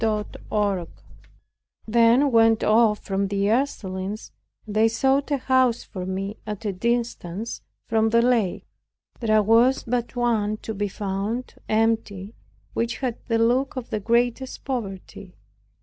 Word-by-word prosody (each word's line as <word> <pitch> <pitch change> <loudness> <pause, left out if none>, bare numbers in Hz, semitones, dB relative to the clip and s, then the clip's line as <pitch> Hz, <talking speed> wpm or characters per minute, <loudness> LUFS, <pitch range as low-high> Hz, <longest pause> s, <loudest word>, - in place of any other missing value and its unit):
CHAPTER 215 -1 -1
13 205 -3 +1
I 170 - -6 1.0
then 235 +5 +4
went 225 -1 +4
off 215 -1 +4
from 195 0 0
the 200 +1 0
Ursulines 210 -6 -2 0.3
and 210 -2 -7
they 220 +1 +5
sought 270 +5 +1
for 290 - +1
a - - -1
house 260 -2 +2
for 185 -3 -7
me 195 +2 -4
at 210 +1 -5
a 205 - -1
distance 230 -1 -2 0.2
from 225 -1 +2
the 230 +1 +4
lake. 235 -7 +1 0.5
There 215 -2 +3
was 230 +5 +4
but 240 +1 -2
one 220 -3 +1
to 220 - -4
be 205 0 -2
found 200 +5 -3 0.2
empty 215 -2 0 0.4
which 235 +1 -1
had 250 -4 -3
the 230 -1 +1
look 245 +4 +2
of 255 -2 -6
the 215 - -1
greatest 240 +4 0
poverty. 200 -6 -6
225 Hz, 150 wpm, -24 LUFS, 205-240 Hz, 1.0 s, they